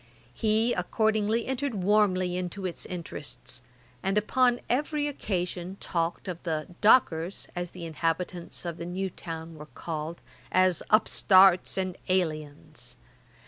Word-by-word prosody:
He 220 - +2
accordingly 220 +4 +1
entered 265 -1 -2
warmly 185 -2 +2
into 185 +2 -4
its 180 - -3
interests, 145 -7 -6 0.4
and 195 +2 0
upon 245 +3 +3
every 295 +3 0
occasion 185 -7 -3
talked 170 +1 -2
of 175 -2 -5
the 155 -3 -2 0.2
dockers, 190 -6 +4
as 175 0 -3
the 175 -1 -8
inhabitants 170 +2 -2
of 170 -1 -4
the 170 - -5
new 190 +1 -2
town 165 -1 -7
were 150 -1 -10
called, 160 +1 -5 0.3
as 185 -2 +3
upstarts 195 -4 +5
and 185 -1 -1
aliens. 155 -7 -2
180 Hz, 125 wpm, -28 LUFS, 165-210 Hz, 0.4 s, upstarts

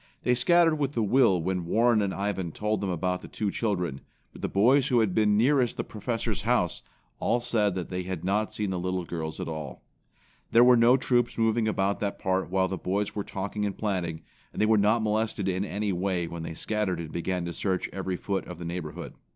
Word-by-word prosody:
They 125 - +3
scattered 165 +5 +4
with 140 -2 -2
a 115 - +2
will 105 -4 +4
when 90 0 -2
Warren 115 +3 +3
and 100 -2 0
Ivan 95 -3 -2
told 105 0 -1
them 100 - -2
about 90 +1 -1
the - - -10
two 105 -2 -2
children, 90 - -2 0.3
but - - -12
the - - -2
boys 125 +7 +4
who 125 -4 +3
had 110 -5 +1
been 105 -1 +3
nearest 125 +1 +2
the - - -1
Professor's 115 -1 -3
house, 110 -6 +1 0.4
all 120 - +1
said 110 -5 +1
that 90 -2 -4
they 90 0 -3
had 90 -2 -5
not 105 +3 0
seen 105 -2 -2
the 90 - -2
little 90 0 -2
girls 80 -2 -5
at - - -4
all. 75 -6 -6 0.7
There 115 +1 +7
were 125 0 +7
no 120 +2 +5
troops 120 -2 +1
moving 115 0 +2
about 100 -2 0
that 100 -1 -2
part 95 -1 -1
while 95 0 +2
the 95 0 -4
boys 100 +2 -1
were 105 - -3
talking 100 +2 -4
and 100 -2 -2
planning, 90 -6 -2 0.3
and - - -8
they 110 - +4
were 110 +1 +4
not 105 +2 +3
molested 110 -2 0
in 95 0 0
any 100 0 -2
way 90 -1 -1
when 85 0 -6
they 80 0 -6
scattered 105 -1 -1
and 80 -2 -6
began 90 +1 -2
to 85 - -4
search 95 0 -1
every 95 -1 -3
foot 95 +2 -3
of 90 - -8
the 85 - -7
neighborhood. 85 -2 -5
100 Hz, 225 wpm, -27 LUFS, 90-110 Hz, 0.7 s, There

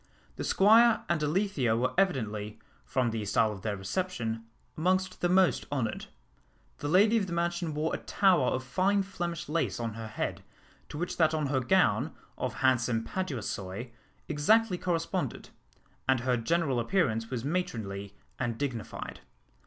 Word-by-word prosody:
The - - -4
Squire 225 +3 +5
and 170 -3 +1
Alethea 150 - +1
were 125 +2 0
evidently, 110 - 0 0.3
from 115 - 0
the 110 -1 -3
style 110 +2 +2
of 100 -3 -8
their 105 0 -2
reception, 115 - -3 0.3
amongst 185 +3 0
the 175 - +2
most 185 0 +3
honoured. 125 -6 -2 0.7
The 145 - -3
lady 205 +8 +5
of 200 -3 0
the 175 - -4
mansion 170 -2 -1
wore 155 +2 -1
a - - -2
tower 185 -10 +3
of 130 +1 0
fine 195 +10 +1
Flemish 175 -4 -4
lace 165 -2 -1
on 115 -2 -3
her 115 0 -6
head, 110 - -3 0.5
to - - -7
which 175 +3 -3
that 160 -2 +3
on 155 -1 0
her 130 - +3
gown, 125 - +2 0.2
of - - -3
handsome 120 -3 +2
paduasoy, 120 - -4 0.4
exactly 180 +6 +3
corresponded; 165 -2 -2 0.6
and 130 -2 +4
her 125 0 +1
general 140 +1 +1
appearance 115 - +1
was 125 -1 -3
matronly 105 - -3 0.2
and 120 -2 -1
dignified. 120 -6 -4
145 Hz, 155 wpm, -29 LUFS, 115-180 Hz, 0.7 s, Squire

